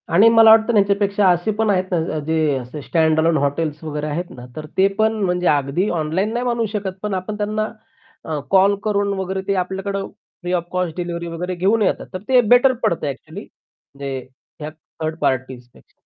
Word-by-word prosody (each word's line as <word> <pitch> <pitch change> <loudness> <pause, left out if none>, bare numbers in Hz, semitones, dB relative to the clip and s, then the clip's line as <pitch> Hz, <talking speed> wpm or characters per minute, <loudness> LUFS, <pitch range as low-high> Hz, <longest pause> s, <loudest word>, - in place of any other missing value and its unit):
आणि 200 +7 +6
मला 225 -1 +7
वाटतं 225 +1 +5
ना 210 - +5
ह्याच्यापेक्षा 200 0 +2
असे 175 +4 +1
पण 220 -1 +1
आहेत 185 -2 +2
ना 175 - +2
ज 155 - -3
जे 160 -3 +1
असे 130 +4 -7
स्टँडअलोन 160 +1 +2
हॉटेल्स 150 +2 -2
वगैरे 150 -1 -4
आहेत 170 +4 -3
ना, 125 -1 -10
तर 155 - -6
ते 190 +1 +5
पण 220 0 +3
म्हणजे 180 -1 0
अगदी 145 +7 +1
ऑनलाईन 175 +6 -1
नाही 240 +1 -2
मानू 235 -2 0
शकत 200 -3 -3
पण 210 -1 -2
आपण 190 +3 -4
त्यांना 215 +1 -1 0.6
अ, 155 -2 -3
कॉल 195 +1 +5
करून 200 -1 0
वगैरे 190 0 -3
ते 200 - +2
आपल्याकडं 195 +2 -3 0.3
फ्री 175 0 -4
ऑफ 175 -2 0
कॉस्ट 180 -3 -2
डिलिव्हरी 170 -1 -4
वगैरे 180 +2 -4
घेऊन 200 +6 +2
येतात. 200 - 0
तर 185 - -4
ते 255 -1 +5
बेटर 245 +3 +5
पडतं 165 - 0
ॲक्चुअली 155 +7 -7
म्हणजे 140 -7 -10 0.4
ह्या 150 0 -5
थर्ड 155 0 -7
पार्टीज 130 -1 -2
पेक्षा. - - -22
180 Hz, 195 wpm, -20 LUFS, 155-205 Hz, 0.6 s, मला